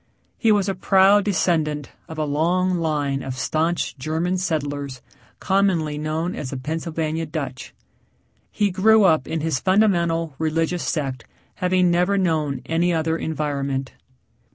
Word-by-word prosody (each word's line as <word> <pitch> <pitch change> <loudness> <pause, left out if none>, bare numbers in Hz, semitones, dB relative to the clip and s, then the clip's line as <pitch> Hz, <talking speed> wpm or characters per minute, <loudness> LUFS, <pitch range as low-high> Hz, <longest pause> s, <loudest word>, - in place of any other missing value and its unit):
He 225 - +3
was 205 -2 +2
a 195 - 0
proud 195 +2 +4
descendant 160 -6 0 0.2
of 160 - -8
a 155 - 0
long 175 +5 +1
line 145 -4 -1
of 130 -1 -5
staunch 160 +6 -1
German 165 +6 -1
settlers 145 -6 -3 0.4
commonly 180 -6 +1
known 160 +4 -2
as 130 - -5
the 135 - -5
Pennsylvania 160 +2 -3
Dutch. 140 -4 -5 0.8
He 205 -2 0
grew 215 +4 +5
up 160 -8 +3
in 160 -1 -2
his 155 -4 0
fundamental, 170 -5 +2
religious 165 +2 0
sect 135 -6 -3 0.3
having 180 -1 +2
never 180 +3 +2
known 155 -7 0
any 170 +2 +1
other 160 -1 0
environment. 140 -4 -3
160 Hz, 135 wpm, -22 LUFS, 150-180 Hz, 0.8 s, grew